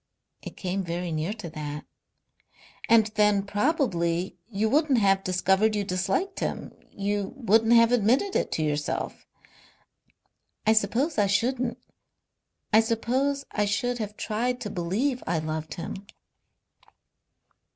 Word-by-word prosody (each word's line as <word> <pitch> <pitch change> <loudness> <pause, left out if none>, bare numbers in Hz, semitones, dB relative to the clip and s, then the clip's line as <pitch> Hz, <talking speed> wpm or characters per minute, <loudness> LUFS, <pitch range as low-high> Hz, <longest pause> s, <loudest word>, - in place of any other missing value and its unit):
"It - - -9
came 190 +1 -2
very 175 0 -3
near 155 +4 -2
to 215 -6 -8
that." 150 -1 -6 1.0
"And 225 -1 +6
then 210 -2 +3
probably 200 - 0
you 215 0 0
wouldn't 285 +2 +3
have 195 -3 +3
discovered 190 +4 +2
you 205 - 0
disliked 195 - -1
him. - - -4 0.2
You 200 0 -2
wouldn't 225 -2 +3
have 230 0 +6
admitted 245 - +2
it - - 0
to 160 - -1
yourself." 150 -1 -3 1.4
"I 220 - +5
suppose 225 - +1
I 205 - +4
shouldn't. 240 +5 0 1.0
I 220 - +8
suppose 255 +5 0
I 210 - 0
should 240 +4 -1
have 210 -1 -5
tried 245 +4 -1
to 210 - -4
believe 210 +10 -1
I 170 - +1
loved 155 0 -4
him." 195 +3 -7
210 Hz, 130 wpm, -26 LUFS, 185-235 Hz, 1.4 s, I